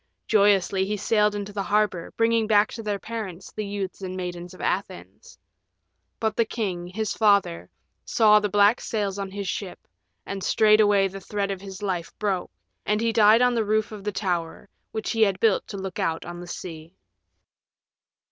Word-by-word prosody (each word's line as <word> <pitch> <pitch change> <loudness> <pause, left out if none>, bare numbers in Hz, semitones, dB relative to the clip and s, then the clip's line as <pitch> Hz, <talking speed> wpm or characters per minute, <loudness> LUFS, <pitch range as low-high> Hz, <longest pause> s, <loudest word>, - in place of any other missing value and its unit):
Joyously 200 -2 +3
he 210 +1 -2
sailed 210 0 +2
into 205 0 -5
the 200 - -2
harbor, 205 -4 0
bringing 230 -1 +2
back 210 -1 +4
to 225 - -6
their 210 -2 -2
parents 195 -5 -7
the 215 - -4
youths 200 -2 -5
and 185 -1 -5
maidens 180 -1 -6
of - - -16
Athens. - - -4 0.8
But 220 -1 -1
the 230 - +3
king, 190 -6 -4
his 210 +4 -3
father, 200 - +2 0.3
saw 210 -1 +5
the 210 0 -1
black 205 +3 +4
sails 205 -3 -2
on 195 -1 -4
his 200 0 -5
ship, 185 0 -5 0.4
and 195 -1 -5
straightway 210 -2 +4
the 195 +1 -9
thread 200 0 -2
of 190 -1 -5
his 195 0 -9
life 180 -4 -3
broke, 195 -4 -1 0.3
and 210 0 0
he 230 0 0
died 220 +2 +6
on 250 0 +3
the 230 -2 +1
roof 215 +1 0
of 210 -2 -8
the 210 - -2
tower 180 -3 -3 0.2
which 220 -1 -3
he 225 - -1
had 195 -3 +3
built 220 -3 +2
to 200 - -6
look 190 -2 -6
out 165 0 -1
on 175 0 -7
the 175 - -9
sea. 165 -1 -8
205 Hz, 185 wpm, -25 LUFS, 190-215 Hz, 0.8 s, died